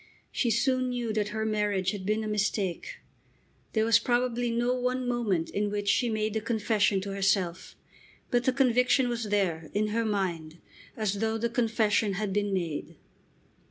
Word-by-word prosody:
She 240 Hz, -, 0 dB
soon 255 Hz, +3 st, +1 dB
knew 240 Hz, -3 st, -2 dB
that 210 Hz, -1 st, 0 dB
her 220 Hz, +1 st, -3 dB
marriage 205 Hz, -3 st, 0 dB
had 200 Hz, -2 st, -6 dB
been 215 Hz, +1 st, +1 dB
a -, -, -3 dB
mistake. 210 Hz, -, -1 dB, 0.8 s
There 220 Hz, -1 st, +2 dB
was 230 Hz, -1 st, +5 dB
probably 245 Hz, 0 st, 0 dB
no 240 Hz, +2 st, +1 dB
one 250 Hz, 0 st, -1 dB
moment 215 Hz, -9 st, 0 dB
in 205 Hz, +1 st, -1 dB
which 205 Hz, 0 st, -3 dB
she 240 Hz, +4 st, +3 dB
made 215 Hz, -1 st, -1 dB
the 220 Hz, -, -1 dB
confession 215 Hz, -3 st, +1 dB
to 195 Hz, 0 st, -5 dB
herself. 190 Hz, -3 st, 0 dB, 0.6 s
But 245 Hz, 0 st, +2 dB
the 260 Hz, -, +4 dB
conviction 250 Hz, 0 st, +3 dB
was 235 Hz, -1 st, -2 dB
there, 185 Hz, -6 st, -1 dB
in 210 Hz, +1 st, +1 dB
her 230 Hz, +2 st, 0 dB
mind, 175 Hz, -7 st, -2 dB, 0.4 s
as 205 Hz, -2 st, -1 dB
though 220 Hz, +1 st, 0 dB
the 235 Hz, +1 st, -1 dB
confession 220 Hz, -3 st, +1 dB
had 200 Hz, 0 st, -2 dB
been 205 Hz, 0 st, 0 dB
made. 170 Hz, -6 st, -3 dB
215 Hz, 170 wpm, -28 LUFS, 200-235 Hz, 0.8 s, was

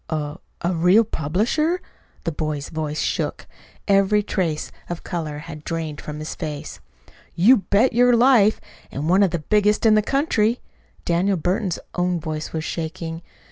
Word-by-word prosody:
"A 150 Hz, +1 st, -3 dB, 0.2 s
a 175 Hz, +1 st, 0 dB
real 180 Hz, +6 st, +5 dB
publisher?" 225 Hz, -, 0 dB, 0.4 s
The 165 Hz, -, -1 dB
boy's 150 Hz, -2 st, -3 dB
voice 155 Hz, -1 st, -3 dB
shook. -, -, -2 dB, 0.4 s
Every 200 Hz, +1 st, +3 dB
trace 170 Hz, -7 st, -2 dB, 0.2 s
of 175 Hz, -1 st, -5 dB
color 160 Hz, -4 st, -4 dB
had 155 Hz, 0 st, -9 dB
drained 160 Hz, -3 st, -4 dB
from 150 Hz, 0 st, -6 dB
his 155 Hz, +1 st, -5 dB
face. 150 Hz, -4 st, -6 dB, 0.6 s
"You 225 Hz, +10 st, +6 dB
bet 210 Hz, +5 st, +2 dB
your 245 Hz, +1 st, +5 dB
life 230 Hz, -4 st, +5 dB, 0.3 s
and 145 Hz, +3 st, -4 dB
one 185 Hz, +4 st, +4 dB
of 195 Hz, -, +4 dB
the 170 Hz, -, -1 dB
biggest 210 Hz, +7 st, +2 dB
in 220 Hz, -, +6 dB
the 215 Hz, -, +5 dB
country." 240 Hz, -3 st, +1 dB, 0.5 s
Daniel 180 Hz, +3 st, +1 dB
Burton's 185 Hz, +2 st, -1 dB, 0.2 s
own 180 Hz, -1 st, 0 dB
voice 155 Hz, -1 st, -5 dB
was 160 Hz, -1 st, -3 dB
shaking. 165 Hz, 0 st, -4 dB
175 Hz, 155 wpm, -22 LUFS, 155-210 Hz, 0.6 s, You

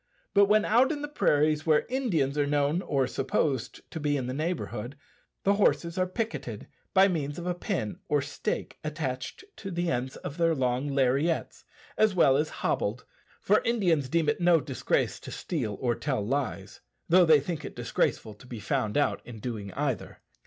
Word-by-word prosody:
But 200 Hz, 0 st, +6 dB
when 210 Hz, +1 st, +3 dB
out 245 Hz, +6 st, +4 dB
in 295 Hz, -2 st, -4 dB
the -, -, -2 dB
prairies 155 Hz, -, +2 dB
where 155 Hz, -1 st, +4 dB
Indians 185 Hz, -, 0 dB
are 145 Hz, -1 st, +1 dB
known 145 Hz, +4 st, +1 dB
or 135 Hz, -7 st, +1 dB
supposed 135 Hz, -1 st, -1 dB
to 160 Hz, -, -5 dB
be 145 Hz, -1 st, +1 dB
in 130 Hz, -, -3 dB
the 125 Hz, -, -3 dB
neighbourhood, 145 Hz, -5 st, -3 dB, 0.5 s
the 200 Hz, -, +4 dB
horses 170 Hz, -4 st, +2 dB
are 185 Hz, -1 st, +1 dB
picketed 185 Hz, -, -4 dB, 0.3 s
by 190 Hz, +1 st, +7 dB
means 150 Hz, -6 st, -2 dB
of 175 Hz, -, -6 dB
a 180 Hz, -, 0 dB
pin 175 Hz, -, -3 dB
or 145 Hz, -, +3 dB
stake 145 Hz, +1 st, -4 dB
attached 145 Hz, -, -4 dB
to 195 Hz, -, -6 dB
the 175 Hz, -1 st, -1 dB
ends 125 Hz, +2 st, -2 dB
of 145 Hz, -, -7 dB
their 165 Hz, -1 st, +3 dB
long 130 Hz, 0 st, 0 dB
lariats, 140 Hz, +4 st, 0 dB, 0.3 s
as 215 Hz, -3 st, +4 dB
well 135 Hz, -6 st, +5 dB
as 150 Hz, +3 st, +1 dB
hobbled; 110 Hz, +5 st, -2 dB, 0.4 s
for 210 Hz, -, +3 dB
Indians 175 Hz, -, +1 dB
deem 165 Hz, +1 st, +1 dB
it 150 Hz, +4 st, +1 dB
no 175 Hz, -1 st, +5 dB
disgrace 135 Hz, -4 st, -1 dB
to -, -, -10 dB
steal 105 Hz, -2 st, -3 dB
or 120 Hz, -2 st, +1 dB
tell 130 Hz, -4 st, -2 dB
lies, 105 Hz, -6 st, -3 dB, 0.3 s
though 180 Hz, +2 st, +6 dB
they 160 Hz, -3 st, +6 dB
think 155 Hz, +2 st, -4 dB
it -, -, -7 dB
disgraceful 110 Hz, -, -1 dB
to 115 Hz, +5 st, -17 dB
be 120 Hz, -3 st, -7 dB
found 105 Hz, +2 st, -1 dB
out 145 Hz, -, +1 dB
in 120 Hz, -3 st, -10 dB
doing 105 Hz, -4 st, -5 dB
either. 135 Hz, -7 st, -3 dB
150 Hz, 185 wpm, -28 LUFS, 130-175 Hz, 0.5 s, by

